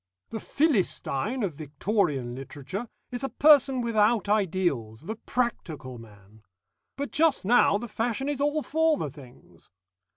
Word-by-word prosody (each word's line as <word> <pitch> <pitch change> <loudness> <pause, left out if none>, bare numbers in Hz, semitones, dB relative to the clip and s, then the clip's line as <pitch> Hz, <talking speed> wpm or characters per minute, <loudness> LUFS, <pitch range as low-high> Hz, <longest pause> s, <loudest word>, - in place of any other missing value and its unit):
"The 220 - -4
Philistine 240 - 0
of 185 -5 -1
Victorian 150 - -1
literature, 145 - -7 0.2
is 245 +1 -3
a 270 - -1
person 275 -3 +5
without 220 -2 +2
ideals, 175 - 0
the 210 +8 -5
practical 155 - -3
man. 105 -1 -16 0.5
But 280 +1 -4
just 310 -8 +2
now 225 -2 +5
the 240 +3 -6
fashion 230 +4 -2
is 290 -1 -2
all 295 +1 +1
for 320 0 +2
the 150 - -3
things. 125 - -16
210 Hz, 135 wpm, -27 LUFS, -, 0.5 s, person